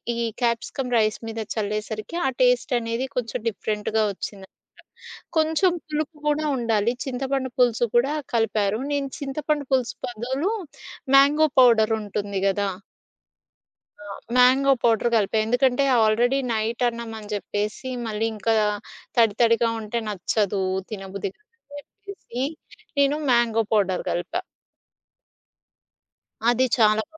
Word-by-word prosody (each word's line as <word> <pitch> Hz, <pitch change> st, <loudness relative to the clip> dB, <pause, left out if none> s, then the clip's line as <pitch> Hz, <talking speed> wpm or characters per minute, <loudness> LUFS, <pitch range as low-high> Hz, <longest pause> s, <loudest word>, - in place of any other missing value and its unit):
ఈ -, -, -5 dB, 0.2 s
capsicum 240 Hz, +2 st, -1 dB
rice 215 Hz, -1 st, +1 dB
మీద 225 Hz, -, -5 dB, 0.2 s
చల్లేసరికి 215 Hz, +6 st, -3 dB
ఆ -, -, +3 dB
టేస్టనేది 245 Hz, 0 st, +1 dB
కొంచెం 245 Hz, -1 st, -2 dB
డిఫరెంట్‌గా 215 Hz, +1 st, -1 dB
ఒచ్చిందనామాట. 195 Hz, 0 st, -8 dB, 0.9 s
కొంచెం 320 Hz, +4 st, +3 dB
పులుపు 305 Hz, 0 st, -3 dB
గూడా 300 Hz, +1 st, +1 dB
ఉండాలి. 230 Hz, -2 st, +1 dB
చింతపండు 265 Hz, 0 st, -2 dB
పులుసు 240 Hz, -1 st, +3 dB
కూడా 260 Hz, +5 st, +3 dB, 0.2 s
కలిపారు. 215 Hz, -1 st, +1 dB
నేను 280 Hz, -1 st, -1 dB
చింతపండు 290 Hz, +1 st, -2 dB
పులుసు 255 Hz, -2 st, +1 dB
పదులు 255 Hz, -, -2 dB, 0.6 s
మ్యాంగో 290 Hz, +3 st, +6 dB
పౌడర్ 230 Hz, -3 st, +5 dB
ఉంటుంది 205 Hz, -1 st, -3 dB
గదా! 200 Hz, +1 st, 0 dB, 1.3 s
ఆ! -, -, -12 dB, 0.3 s
Mango 265 Hz, +2 st, +5 dB
powder 235 Hz, 0 st, +3 dB
కలిపా. 220 Hz, 0 st, +1 dB
ఎందుకంటే 245 Hz, +3 st, +2 dB, 0.2 s
ఆల్రెడీ 235 Hz, +5 st, +3 dB
నైటన్నం 230 Hz, +1 st, -1 dB
అని 210 Hz, 0 st, -11 dB
జేప్పేసి 210 Hz, +5 st, -3 dB, 0.2 s
మళ్ళీ 215 Hz, 0 st, -1 dB
ఇంకా 225 Hz, +2 st, 0 dB, 0.6 s
తడి 225 Hz, -3 st, +4 dB
తడిగా 230 Hz, 0 st, +4 dB
ఉంటే 220 Hz, +2 st, -3 dB
నచ్చదు, 200 Hz, 0 st, -1 dB, 0.3 s
తినబుద్ధి 195 Hz, -1 st, -5 dB
కాదు 425 Hz, -, -39 dB, 0.3 s
అని 290 Hz, -, -9 dB, 0.2 s
జెప్పేసి 265 Hz, -11 st, -5 dB, 0.6 s
నేను 280 Hz, +1 st, +4 dB, 0.2 s
మ్యాంగో 230 Hz, -2 st, +3 dB
పౌడర్ 190 Hz, -4 st, +1 dB
గలిపా. 185 Hz, -, -2 dB, 2.1 s
అది 245 Hz, +2 st, +3 dB
చాలా 215 Hz, -1 st, +4 dB
బా 320 Hz, -, -17 dB
235 Hz, 115 wpm, -24 LUFS, 215-265 Hz, 2.1 s, మ్యాంగో